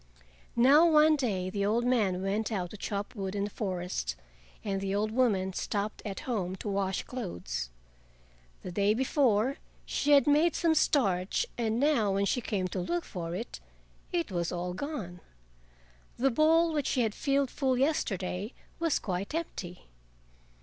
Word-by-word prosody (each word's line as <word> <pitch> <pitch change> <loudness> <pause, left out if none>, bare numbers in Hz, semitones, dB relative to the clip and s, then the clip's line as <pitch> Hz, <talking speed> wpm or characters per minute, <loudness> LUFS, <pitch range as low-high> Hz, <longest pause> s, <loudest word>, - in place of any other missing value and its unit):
Now 285 +8 +6
one 310 0 +6
day 195 -10 -1
the 200 0 -1
old 225 +4 +1
man 205 -7 +1
went 210 +4 -1
out 180 -5 -2
to - - -8
chop 200 0 -4
wood 195 -3 -4
in 200 - 0
the 205 - -2
forest, 180 - -3 0.5
and 195 -2 -2
the 195 0 -1
old 215 +1 0
woman 210 -6 +1
stopped 205 +3 -3
at 200 -3 -5
home 190 -7 -2
to 190 - -7
wash 195 -1 -1
clothes. 85 - -5 0.9
The 180 - -5
day 200 +3 +2
before, 260 -1 +2 0.3
she 290 - +1
had 280 - +6
made 300 +3 +4
some 330 -2 +3
starch, 195 - +2
and 225 -1 0
now 250 -9 +2
when 200 0 +2
she 245 - 0
came 195 -5 -1
to 185 - -3
look 175 -1 -2
for 170 -2 -5
it, 230 +6 -6 0.5
it 340 - -1
was 175 -2 -1
all 180 0 -3
gone; 195 - -5 1.0
the 270 +2 +2
bowl 325 +4 +4
which 295 -2 0
she 255 - +1
had 220 -3 0
filled 275 0 0
full 260 -3 0
yesterday 205 - -1 0.3
was 330 -3 +2
quite 195 - -3
empty. 180 - -5
210 Hz, 165 wpm, -30 LUFS, 185-270 Hz, 1.0 s, Now